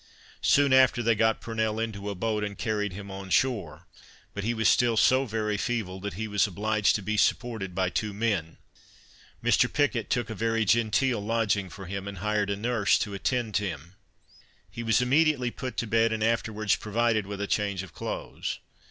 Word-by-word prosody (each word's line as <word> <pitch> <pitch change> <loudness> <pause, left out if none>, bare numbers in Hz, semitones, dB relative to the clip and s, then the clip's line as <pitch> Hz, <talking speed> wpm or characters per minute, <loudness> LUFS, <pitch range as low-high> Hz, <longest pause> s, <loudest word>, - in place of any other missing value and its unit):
Soon 140 -1 +4
after 130 -2 +5
they 115 0 +4
got 110 +1 +1
Purnell 110 -1 -2
into 105 -3 -3
a 100 - -4
boat, 105 +2 -1
and 105 -1 -4
carried 105 -3 -1
him 100 +2 -8
on 95 0 -7
shore; 90 - 0 0.5
but 100 - -4
he 115 - 0
was 110 -1 +1
still 120 -2 +3
so 130 +4 +4
very 105 -2 -1
feeble, 105 -5 -2
that 100 -2 -5
he 110 +3 -3
was 105 0 +2
obliged 105 +2 +1
to 105 - -3
be 105 +2 -1
supported 105 -6 0
by 95 -1 0
two 105 +2 -1
men. 100 -6 -2 0.9
Mr. - - +3
Picket 140 -6 0
took 120 -2 -1
a - - -2
very 115 +1 0
genteel 115 +2 +2
lodging 105 -3 0
for 95 +1 -9
him, 100 +2 -5
and 100 -1 -6
hired 105 +1 0
a 100 - 0
nurse 110 -1 +2
to 105 - -3
attend 110 +1 -1
him; 85 -4 -5 0.8
he 120 - -6
was 115 +2 +2
immediately 135 -1 +2
put 130 +1 -6
to - - 0
bed, 115 +1 +2
and 110 -1 -1
afterwards 110 -2 +1
provided 110 -1 0
with 100 -1 -6
a 100 - -1
change 100 -2 -1
of 90 -3 -12
clothes. - - -5
110 Hz, 190 wpm, -27 LUFS, 100-115 Hz, 0.9 s, after